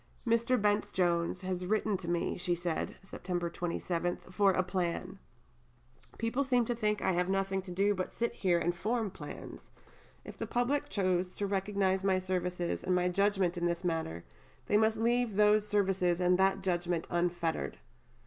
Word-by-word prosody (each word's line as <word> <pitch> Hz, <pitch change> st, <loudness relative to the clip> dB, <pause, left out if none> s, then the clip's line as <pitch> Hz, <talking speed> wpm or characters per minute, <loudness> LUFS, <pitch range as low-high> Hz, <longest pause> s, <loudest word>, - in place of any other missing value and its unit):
"Dr. 235 Hz, +2 st, +3 dB
Bence 205 Hz, -1 st, +1 dB
Jones 175 Hz, -1 st, +1 dB
has 185 Hz, -1 st, -3 dB
written 215 Hz, 0 st, +1 dB
to 180 Hz, -2 st, -7 dB
me," 175 Hz, 0 st, 0 dB
she 175 Hz, 0 st, 0 dB
said 170 Hz, -1 st, -3 dB
(Sept. 175 Hz, -3 st, -4 dB
27), 175 Hz, 0 st, -2 dB
"for 200 Hz, +1 st, +4 dB
a 185 Hz, 0 st, +1 dB
plan. 185 Hz, +1 st, -3 dB, 1.0 s
People 230 Hz, +5 st, 0 dB
seem 250 Hz, -3 st, +2 dB
to 240 Hz, -, -1 dB
think 210 Hz, -2 st, 0 dB
that -, -, 0 dB
I -, -, +4 dB
have 180 Hz, +1 st, 0 dB
nothing 195 Hz, 0 st, 0 dB
to 185 Hz, -, -12 dB
do 195 Hz, +3 st, +2 dB
but 185 Hz, -2 st, -3 dB
to -, -, -20 dB
sit 235 Hz, 0 st, -1 dB
here 180 Hz, -3 st, +2 dB
and 175 Hz, +1 st, 0 dB
form 220 Hz, +2 st, -1 dB
plans. -, -, -9 dB, 0.6 s
If -, -, -9 dB
the -, -, -4 dB
public 280 Hz, +4 st, 0 dB
choose 185 Hz, -4 st, 0 dB
to 205 Hz, -, -2 dB
recognize 195 Hz, -1 st, 0 dB
my 190 Hz, -1 st, +3 dB
services 180 Hz, -1 st, -2 dB
and 185 Hz, -, +1 dB
my 180 Hz, 0 st, +2 dB
judgment 190 Hz, -2 st, +1 dB
in 175 Hz, -, +1 dB
this 170 Hz, +1 st, -2 dB
manner, 160 Hz, -, -2 dB, 0.4 s
they -, -, +1 dB
must 220 Hz, +1 st, +3 dB
leave 235 Hz, -1 st, +1 dB
those 210 Hz, 0 st, +4 dB
services 190 Hz, -4 st, +1 dB
and 180 Hz, 0 st, +3 dB
that 195 Hz, 0 st, +3 dB
judgment 175 Hz, -2 st, 0 dB
unfettered." 175 Hz, -, -1 dB
185 Hz, 175 wpm, -32 LUFS, 175-210 Hz, 1.0 s, for